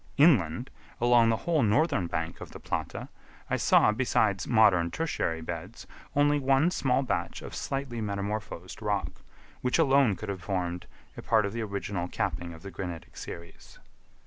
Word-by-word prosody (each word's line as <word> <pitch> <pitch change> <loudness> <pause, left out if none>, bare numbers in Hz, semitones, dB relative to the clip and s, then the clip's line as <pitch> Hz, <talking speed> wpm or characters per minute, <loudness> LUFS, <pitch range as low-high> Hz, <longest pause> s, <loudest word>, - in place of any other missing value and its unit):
Inland, 125 - +4 0.3
along 120 -1 +5
the 115 - +2
whole 165 -4 +2
northern 110 - +2
bank 80 0 -4
of - - -9
the - - -9
Plata, - - -4 0.4
I - - +2
saw, - - +5
besides 105 -4 +1
modern 100 -7 +4
tertiary 85 - -2
beds, 85 +6 -7 0.3
only 145 0 +4
one 135 +5 +3
small 135 -5 +1
patch 130 - -3
of - - -8
slightly 135 -4 -3
metamorphosed 100 -2 -4
rock, 105 -2 -2 0.4
which 125 - +1
alone 135 - +4
could 110 - -7
have 95 -2 -4
formed 90 -2 -3 0.3
a - - -7
part 110 -2 +3
of 100 - -3
the 115 - -3
original 100 -3 -3
capping 85 -1 -3
of 80 -1 -12
the 100 - -7
granitic 85 -2 -7
series. 85 0 -10
105 Hz, 160 wpm, -28 LUFS, 90-130 Hz, 0.4 s, along